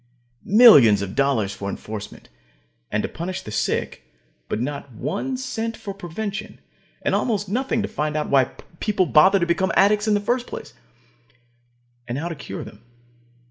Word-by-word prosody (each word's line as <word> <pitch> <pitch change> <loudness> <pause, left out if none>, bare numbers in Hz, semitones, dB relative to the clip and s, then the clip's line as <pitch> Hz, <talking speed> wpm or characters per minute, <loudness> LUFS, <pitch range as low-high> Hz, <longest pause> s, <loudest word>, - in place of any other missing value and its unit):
Millions 145 - +7
of 95 0 -5
dollars 125 -7 +1
for 100 +1 -5
enforcement, 105 +1 -8 0.6
and 105 0 0
to - - -1
punish 180 +3 -5
the 105 - -8
sick, - - -2 0.5
but - - -2
not 140 +2 -4
one 160 - -3
cent 230 -3 -4
for 215 -4 -6
prevention, 200 +3 -6 0.4
and - - 0
almost 205 -4 0
nothing 230 +1 -1
to - - -1
find 150 0 -2
out 150 - -1
why 135 -2 +4 0.3
people 210 -3 +1
become 175 +3 +4
addicts 210 +2 +4
in 210 - +3
the - - +2
first 240 +4 -1
place, - - -8 1.3
and 120 +1 -3
how 160 +4 -3
to 170 - -4
cure 145 - -7
them. 105 - -13
175 Hz, 155 wpm, -22 LUFS, 135-210 Hz, 1.3 s, Millions